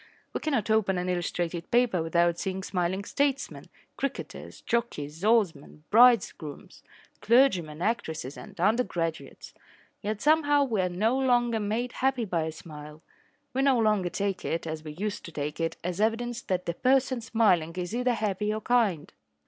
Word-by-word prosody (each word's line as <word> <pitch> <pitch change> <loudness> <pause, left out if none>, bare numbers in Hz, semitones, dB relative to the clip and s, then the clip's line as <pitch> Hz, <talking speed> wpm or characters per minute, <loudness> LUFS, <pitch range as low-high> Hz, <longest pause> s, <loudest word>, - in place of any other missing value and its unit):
We - - -2
cannot 255 -9 -1
open 195 -4 +2
an 180 +1 -2
illustrated 175 -1 -2
paper 235 -7 +2
without 170 +1 +1
seeing 190 0 -3
smiling 185 +1 -1
statesmen, 280 +4 -1 0.3
cricketers, 275 -1 -5
jockeys, 165 -9 -3
oarsmen, 185 -10 +1
bridegrooms, 220 -10 +3 0.4
clergymen, 180 - +3
actresses 160 - -2
and - - -12
undergraduates. 175 - -1 0.5
Yet 210 0 -3
somehow 290 0 +4
we 225 -8 0
are 180 - 0
no 215 +8 +1
longer 240 -3 +2
made 220 +4 -2
happy 265 -3 0
by 170 -5 -1
a 160 - -3
smile. 150 -1 -11 0.5
We 265 - +1
no 270 -2 +4
longer 210 -5 +2
take 195 0 -2
it, 165 - -2
as 155 -1 -5
we 155 -1 -7
used 205 +5 -4
to 170 - -8
take 150 0 -4
it, 165 0 -2
as 180 +3 -2
evidence 230 +2 0
that 180 -1 -2
the 170 - -1
person 260 +3 +2
smiling 190 -8 +2
is 180 +4 -4
either 250 0 +1
happy 210 -1 -1
or 215 0 -3
kind. 205 -9 +1
200 Hz, 155 wpm, -28 LUFS, 170-235 Hz, 0.5 s, somehow